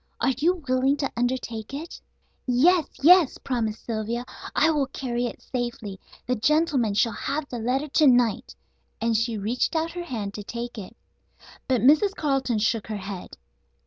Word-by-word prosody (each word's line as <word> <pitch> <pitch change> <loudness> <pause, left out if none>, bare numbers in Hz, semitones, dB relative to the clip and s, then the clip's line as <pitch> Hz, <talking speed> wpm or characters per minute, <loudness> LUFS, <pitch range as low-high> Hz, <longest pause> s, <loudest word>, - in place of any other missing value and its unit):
Are 260 +3 +2
you 345 +2 +1
willing 260 +2 +2
to 275 -1 -2
undertake 245 -1 -2
it?" 320 +4 -7 0.5
"Yes! 310 +7 +4 0.2
Yes!" 350 -2 +6
promised 225 -5 -3
Sylvia. 230 +2 -3 0.3
"I 325 - +4
will 290 -3 +1
carry 245 -2 -2
it - - -9
safely. 235 -6 -4 0.3
The 250 - 0
gentleman 270 -4 +2
shall 230 +2 +3
have 285 +7 -3
the 240 - -5
letter 255 +6 0
to 300 +1 +4
night," 245 -4 +2 0.4
and 230 0 +1
she 225 0 0
reached 225 - -1
out 325 +1 0
her 350 0 -6
hand 215 -8 -4
to 210 - -6
take 235 +2 -6
it. 190 - -10 0.7
But 255 -4 +2
Mrs. 310 - +4
Carleton 270 - 0
shook 220 0 0
her 215 -1 -3
head. 195 -1 -7
245 Hz, 165 wpm, -25 LUFS, 225-290 Hz, 0.7 s, Yes